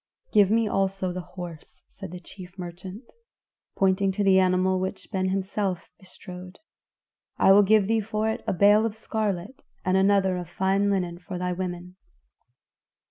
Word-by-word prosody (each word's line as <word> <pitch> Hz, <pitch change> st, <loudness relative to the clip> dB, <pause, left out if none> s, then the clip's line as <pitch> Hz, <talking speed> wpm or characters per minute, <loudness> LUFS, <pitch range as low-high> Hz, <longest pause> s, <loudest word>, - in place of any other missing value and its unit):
"Give 205 Hz, -3 st, +5 dB
me 225 Hz, +1 st, +2 dB
also 195 Hz, -2 st, -1 dB
the 185 Hz, -, -4 dB
horse," 175 Hz, -3 st, -10 dB
said -, -, -10 dB
the 180 Hz, +1 st, -8 dB
chief 180 Hz, +1 st, -12 dB
merchant, 185 Hz, +6 st, -9 dB, 0.6 s
pointing 195 Hz, 0 st, +2 dB
to 205 Hz, -, -1 dB
the 190 Hz, -1 st, +5 dB
animal 185 Hz, 0 st, +2 dB
which 190 Hz, +1 st, -4 dB
Ben 190 Hz, -2 st, -1 dB
Hesed 185 Hz, -, 0 dB
himself 195 Hz, -2 st, -2 dB
bestrode. 180 Hz, -1 st, -11 dB, 0.8 s
"I -, -, +5 dB
will 200 Hz, +1 st, +8 dB
give 205 Hz, 0 st, +4 dB
thee 225 Hz, 0 st, +2 dB
for 215 Hz, +1 st, -2 dB
it 220 Hz, -, -2 dB
a -, -, +1 dB
bale 205 Hz, +4 st, +5 dB
of 215 Hz, -, -7 dB
scarlet 215 Hz, 0 st, -3 dB, 0.2 s
and 185 Hz, 0 st, +2 dB
another 190 Hz, -1 st, +3 dB
of 175 Hz, -2 st, -6 dB
fine 195 Hz, +3 st, +1 dB
linen 180 Hz, -3 st, -1 dB
for 180 Hz, 0 st, -7 dB
thy 180 Hz, 0 st, -2 dB
women." 180 Hz, 0 st, -6 dB
190 Hz, 165 wpm, -25 LUFS, 180-200 Hz, 0.8 s, will